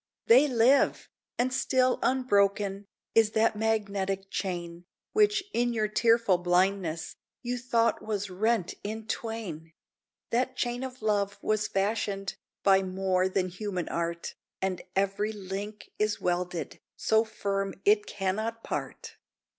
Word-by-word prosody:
They 260 +6 +7
live! 255 +1 +3 0.3
and 255 +1 +1
still 255 -1 +2
unbroken 200 -5 +1 0.3
Is 225 -1 +4
that 220 0 +3
magnetic 200 -3 -1
chain, 175 -2 -4 0.3
Which, 420 -1 +3
in 240 0 +1
your 215 -2 +1
tearful 225 -3 +3
blindness, 180 -2 0 0.3
You 245 0 -2
thought 230 -2 +1
was 210 -2 -2
rent 215 0 +1
in 220 +1 -5
twain. 200 -10 -5 0.6
That 255 +2 +1
chain 245 +1 -2
of 255 -3 -7
love 205 -2 +1
was 215 0 +1
fashioned 195 -1 -1 0.3
By 195 -1 +5
more 185 0 0
than 185 -1 0
human 185 -1 -4
art, 170 0 -3 0.3
And 190 -2 -2
every 200 +2 0
link 205 +1 -6
is 210 0 +1
welded 175 -1 -2 0.2
So 220 0 +3
firm 195 -3 -2
it 420 +1 +4
cannot 215 +4 -2
part. - - -5
205 Hz, 125 wpm, -28 LUFS, 190-230 Hz, 0.6 s, They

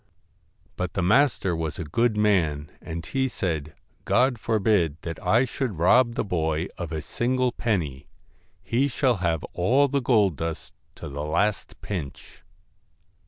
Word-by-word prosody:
But 90 0 -3
the 95 - -1
master 100 -3 +3
was 80 -2 -3
a - - -4
good 110 +8 +1
man, 80 -9 +1
and 80 +1 -6
he 135 -1 0
said: 80 - -3
' - - -38
God 125 -1 +2
forbid 105 -9 +1
that 85 -2 -6
I 120 +4 +4
should 125 - -3
rob 120 +8 +4
the - - 0
boy 80 -3 -1
of 85 -3 -6
a 80 -2 -3
single 125 - 0
penny; 80 - -2 0.6
he 130 +4 +1
shall 130 -3 +1
have 85 -4 -1
all 130 +11 +3
the 140 0 0
gold 105 - +3
dust 80 +1 -5 0.2
to - - -8
the 70 +2 -5
last 100 +7 -1
pinch.' 85 -9 -6
95 Hz, 155 wpm, -25 LUFS, 80-120 Hz, 0.6 s, I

